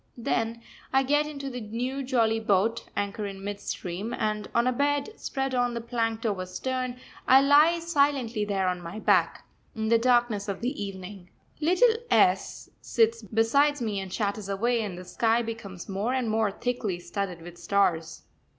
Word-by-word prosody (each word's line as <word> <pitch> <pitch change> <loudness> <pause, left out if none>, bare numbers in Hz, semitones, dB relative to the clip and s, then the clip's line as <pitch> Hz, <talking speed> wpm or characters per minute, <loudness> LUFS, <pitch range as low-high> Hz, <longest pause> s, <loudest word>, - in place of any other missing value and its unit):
Then 230 0 -1 0.3
I 270 0 +4
get 295 +3 +2
into 280 -2 -6
the 250 -1 -5
new 245 +6 -3
jolly 230 -4 +1
boat, 220 +2 +1
anchor 205 +1 -2
in 195 -1 -8
mid 205 0 -4
stream, 195 +4 -4
and 210 -1 -2
on 235 - +3
a 255 - +3
bed, 285 - 0
spread 270 -1 -2
on 245 -1 +1
the - - -2
planked 230 -1 -2
over 190 -4 -1
stern, 255 +5 -3 0.3
I 260 +1 +8
lie 300 +4 +6
silently 280 -9 +1
there 195 -2 0
on 180 -1 -1
my 170 +5 -7
back, 190 -6 +2 0.3
in 220 -1 -2
the 230 0 +5
darkness 240 -4 +2
of 200 0 -4
the 245 -2 -2
evening. 190 -1 -8 0.3
Little 370 +10 +4 0.2
S 190 - +2
sits 230 -1 +2
beside 235 +8 +2
me 215 -4 -2
and 190 -1 -6
chatters 205 0 -2
away, 230 +4 +1
and 200 -5 -4
the 180 - -9
sky 230 +4 +1
becomes 210 -6 -7
more 205 +6 -1
and 245 -4 0
more 220 -1 +2
thickly 215 -5 -2
studded 175 -1 -4
with 175 0 -11
stars. 180 -5 0
225 Hz, 175 wpm, -27 LUFS, 200-250 Hz, 0.3 s, I